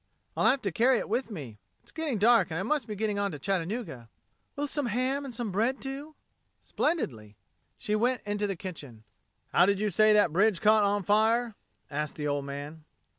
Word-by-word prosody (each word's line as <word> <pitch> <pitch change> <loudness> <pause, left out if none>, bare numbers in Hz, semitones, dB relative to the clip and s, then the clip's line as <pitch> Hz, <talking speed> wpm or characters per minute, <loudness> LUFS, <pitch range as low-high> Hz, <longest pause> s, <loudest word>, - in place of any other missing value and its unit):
"I'll - - +4
have 270 - +1
to 195 - -1
carry 245 +7 +3
it - - -3
with 240 +5 -1
me. 135 - -8 0.2
It's - - -15
getting 315 -7 -2
dark 220 -2 +4
and 160 - -3
I - - -2
must 270 +2 -1
be 210 - -5
getting 210 0 -1
on 200 -1 0
to - - -5
Chattanooga." 175 - -3 0.5
"Will 290 - -2
some 290 -2 -2
ham 255 +5 -1
an' 270 - -6
some 235 -3 -4
bread 230 +8 0
do?" 280 +3 -7 0.4
"Splendidly." 115 - -2 0.4
She 210 - -3
went 245 +3 0
into 205 0 -1
the 195 - -2
kitchen. 150 - -9 0.5
"How 175 - +5
did 200 -1 +2
you 210 0 0
say 215 +4 +5
that 205 -7 +4
bridge 195 0 +3
caught 215 0 +5
on 205 0 +1
fire?" 220 +4 +2 0.4
asked 150 +1 -3
the 150 -1 -3
old 145 -1 -1
man. 145 +3 -7
210 Hz, 200 wpm, -28 LUFS, 165-240 Hz, 0.5 s, How